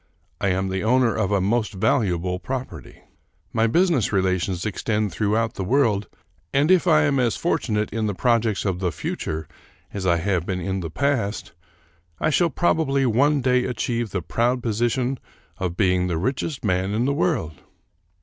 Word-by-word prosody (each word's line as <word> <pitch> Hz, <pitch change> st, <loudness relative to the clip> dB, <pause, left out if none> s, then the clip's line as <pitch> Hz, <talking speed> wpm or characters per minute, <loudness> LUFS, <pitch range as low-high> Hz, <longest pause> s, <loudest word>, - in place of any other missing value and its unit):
I -, -, 0 dB
am 95 Hz, 0 st, 0 dB
the 95 Hz, 0 st, -2 dB
owner 125 Hz, +1 st, +3 dB
of 105 Hz, -3 st, 0 dB
a 100 Hz, -, +3 dB
most 110 Hz, +3 st, 0 dB
valuable 95 Hz, -5 st, 0 dB
property. 130 Hz, +4 st, -7 dB, 0.5 s
My 115 Hz, 0 st, +2 dB
business 165 Hz, -, +2 dB
relations 95 Hz, -2 st, 0 dB
extend 105 Hz, 0 st, -1 dB
throughout 110 Hz, +4 st, 0 dB
the 95 Hz, -, -4 dB
world, 105 Hz, -2 st, +1 dB, 0.4 s
and 145 Hz, +5 st, +3 dB
if 185 Hz, -1 st, +4 dB
I 155 Hz, -2 st, +5 dB
am 140 Hz, -3 st, +2 dB
as 120 Hz, -3 st, +1 dB
fortunate 110 Hz, -10 st, -1 dB
in 110 Hz, -1 st, -1 dB
the 100 Hz, -, -2 dB
projects 115 Hz, -2 st, +1 dB
of 95 Hz, -3 st, -1 dB
the 90 Hz, -2 st, 0 dB
future 80 Hz, -2 st, -4 dB, 0.5 s
as 95 Hz, -2 st, -3 dB
I 85 Hz, -1 st, +3 dB
have 90 Hz, 0 st, 0 dB
been 90 Hz, 0 st, -3 dB
in 95 Hz, +2 st, -2 dB
the 85 Hz, -3 st, -4 dB
past, 115 Hz, -, -1 dB, 0.7 s
I 155 Hz, -, +1 dB
shall 170 Hz, +3 st, +3 dB
probably 140 Hz, -4 st, +1 dB
one 140 Hz, +5 st, +3 dB
day 125 Hz, 0 st, +2 dB
achieve 120 Hz, -2 st, -2 dB
the 90 Hz, -3 st, -3 dB
proud 120 Hz, -, 0 dB
position 120 Hz, +3 st, 0 dB, 0.4 s
of 90 Hz, -2 st, -3 dB
being 90 Hz, -3 st, +2 dB
the 85 Hz, -3 st, -1 dB
richest 130 Hz, -, -2 dB
man 95 Hz, +1 st, 0 dB
in 115 Hz, +3 st, +1 dB
the 140 Hz, -, +1 dB
world." 145 Hz, -, -1 dB
110 Hz, 170 wpm, -23 LUFS, 95-130 Hz, 0.7 s, I